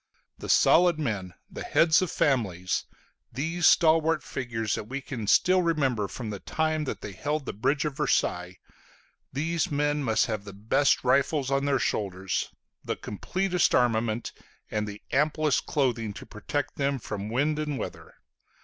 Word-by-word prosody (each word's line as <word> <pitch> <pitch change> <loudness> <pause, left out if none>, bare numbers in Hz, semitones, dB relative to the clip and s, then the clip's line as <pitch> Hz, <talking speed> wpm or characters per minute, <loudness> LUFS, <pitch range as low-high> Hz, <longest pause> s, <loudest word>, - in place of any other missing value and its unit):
The - - -7
solid 175 -1 +5
men, 105 - -3
the - - -9
heads 160 0 +4
of 185 - -1
families, 95 -13 0 0.5
these 160 +7 +1
stalwart 160 -1 +4
figures 115 -4 -3
that - - -3
we 130 +5 -4
can 125 -6 -6
still 185 - +4
remember 135 - +1
from 115 -1 -6
the 100 - -5
time 155 +3 -1
that - - -5
they 105 - -6
held 145 +9 -3
the - - -4
bridge 135 +8 0
of 150 -2 -3
Versailles, 90 - 0 0.7
these 160 +3 -1
men 145 0 0
must 110 -4 +2
have 110 -3 -3
the 100 -1 -10
best 110 +8 +2
rifles 140 +1 +2
on 140 0 +1
their 140 -1 +2
shoulders, 95 -5 -2 0.3
the - - -2
completest 180 - 0
armament, 115 -2 +1 0.4
and 105 -1 -1
the 105 0 -8
amplest 150 +1 +1
clothing 120 -7 0
to - - -10
protect 145 +7 -4
them 140 0 0
from 105 -3 -5
wind 145 +6 0
and 150 -2 -2
weather. - - -7
135 Hz, 160 wpm, -27 LUFS, 110-150 Hz, 0.7 s, solid